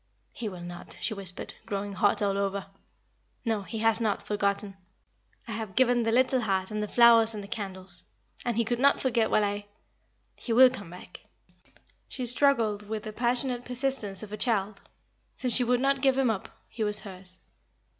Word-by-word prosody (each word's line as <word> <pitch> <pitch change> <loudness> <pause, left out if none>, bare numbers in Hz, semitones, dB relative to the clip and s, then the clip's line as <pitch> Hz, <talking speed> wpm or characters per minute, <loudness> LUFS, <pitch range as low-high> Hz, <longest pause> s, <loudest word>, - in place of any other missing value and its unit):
"He 225 -3 -5
will 180 -3 -9
not," 175 0 -10
she 220 - -2
whispered, 195 -3 -4
growing 200 0 -4
hot 205 +1 +1
all 200 -1 +1
over. 200 -1 -2 0.8
"No, 220 -3 0
he 220 +3 -7
has 225 0 +3
not 215 -3 -1
forgotten. 200 -1 -2 0.7
I - - -6
have 215 -4 -5
given 245 -2 +3
the 225 -1 0
little 255 +1 +3
heart 190 -2 -1
and 215 0 -2
the 210 - -2
flowers 230 -1 +5
and 205 0 -8
candles. 190 -4 -6 0.4
And 240 -2 -2
he 235 - +2
could 240 +1 -2
not 280 +2 +4
forget 235 -4 +1
while 215 - +3
I 205 0 -3 0.7
He 235 - -3
will 255 +2 +7
come 205 -9 -7
back." 180 +1 -12 0.8
She 255 - -3
struggled 230 -5 +4
with 215 -1 -4
the 215 -2 -7
passionate 245 +1 -1
persistence 250 -6 -2
of 210 -1 -9
a - - -4
child. 205 -3 0 0.5
Since 250 -2 +1
she 250 - +5
would 245 0 +2
not 275 +1 +1
give 270 -1 +3
him 260 -4 +3
up, 200 -3 -5 0.2
he 225 - -4
was 210 0 +4
hers. 185 -2 -5
215 Hz, 185 wpm, -28 LUFS, 200-240 Hz, 0.8 s, will